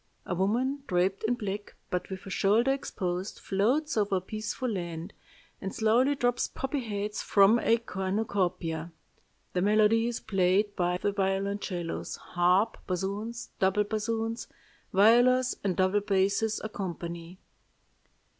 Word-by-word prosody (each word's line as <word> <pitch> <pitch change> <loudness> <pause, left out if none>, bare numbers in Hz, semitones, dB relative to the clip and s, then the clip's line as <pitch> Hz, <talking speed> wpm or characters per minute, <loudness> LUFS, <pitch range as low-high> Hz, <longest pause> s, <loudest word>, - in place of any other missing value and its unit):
A - - -2
woman 240 +10 0
draped 185 +1 +1
in 245 +2 +2
black, 205 -2 -5 0.2
but 180 0 -2
with 190 -1 -7
a 195 - -7
shoulder 220 +8 +3
exposed, 185 -7 -3
floats 250 +11 0
over 205 -3 +1
a - - +2
peaceful 215 +6 -4
land, 170 -6 -4 0.5
and 190 - -5
slowly 240 +6 +3
drops 245 -2 +1
poppy 270 +2 -3
heads 210 -3 -3
from 205 +3 +5
a 230 - +3
cornucopia. 185 -5 -2 0.6
The 180 - +1
melody 215 +3 +4
is 240 - -2
played 195 +1 +1
by 180 0 +1
the 205 - 0
violoncellos. 195 -2 -2
Harp, 180 +5 +1
bassoons, 200 +5 -3
double 195 +2 +3
bassoons, 225 +2 -2 0.4
violas, 245 +5 +5
and 190 -3 0
double 190 +2 +3
basses 200 +2 +1
accompany. 175 -4 -5
200 Hz, 125 wpm, -29 LUFS, 185-225 Hz, 0.6 s, from